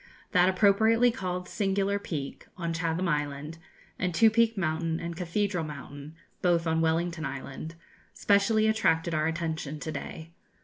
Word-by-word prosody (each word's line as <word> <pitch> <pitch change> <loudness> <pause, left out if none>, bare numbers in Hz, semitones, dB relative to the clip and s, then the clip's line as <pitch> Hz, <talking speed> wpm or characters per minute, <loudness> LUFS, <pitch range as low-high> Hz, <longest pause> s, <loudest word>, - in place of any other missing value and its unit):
That 180 -1 +5
appropriately 220 +5 +4
called 180 -4 -4
Singular 200 0 0
Peak 150 -8 -6
on 170 -2 -2
Chatham 165 +2 -1
Island 150 0 -2 0.4
and 180 -2 -1
Two 225 +4 +6
peak 230 -1 +3
Mountain 165 -1 -1
and 170 0 -5
Cathedral 180 +1 -1
Mountain 145 0 -8 0.3
both 175 -2 +2
on 160 0 +1
Wellington 165 0 0
Island 140 +3 -6 0.4
specially 215 +2 +3
attracted 170 -7 +2
our 155 0 +1
attention 160 -2 -3
to 155 +3 -4
day. 160 +3 -7
170 Hz, 140 wpm, -28 LUFS, 160-195 Hz, 0.4 s, Two